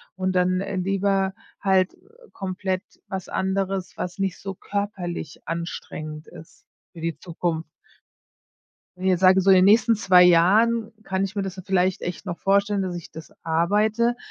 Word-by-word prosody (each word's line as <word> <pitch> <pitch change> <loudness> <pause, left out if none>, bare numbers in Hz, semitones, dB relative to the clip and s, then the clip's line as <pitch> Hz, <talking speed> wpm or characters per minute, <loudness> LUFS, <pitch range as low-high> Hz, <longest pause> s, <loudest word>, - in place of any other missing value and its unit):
und 185 0 -1
dann, 180 0 +2
äh, 195 0 -4
lieber 195 +1 +1 0.3
halt, 190 -2 +2
äh, - - -23 0.3
komplett 185 0 -3 0.3
was 190 -1 -5
anderes, 190 0 -2
was 180 +2 -4
nicht 195 -3 -2
so 195 -1 -6
körperlich 185 -7 -4
anstrengend 155 -2 -6
ist 160 - -15 0.3
für 165 - -10
die 165 -1 -3
Zukunft. 165 -2 -3 1.3
Ne, 185 0 +2
sage 185 +1 +5
so 195 +1 +5
in 190 - +7
den 185 - +5
nächsten 225 +3 +5
zwei 185 -4 +6
Jahren 215 +7 +4
kann 190 -1 -1
ich 195 +1 -4
mir 200 - -1
das 190 0 -6
vielleicht 185 -1 +1
echt 180 +3 -5
noch 175 -3 -5
vorstellen, 200 +1 +2
dass 185 -2 -3
ich 175 - -8
das 160 0 -11
arbeite, 210 +8 +2
190 Hz, 160 wpm, -24 LUFS, 175-195 Hz, 1.3 s, in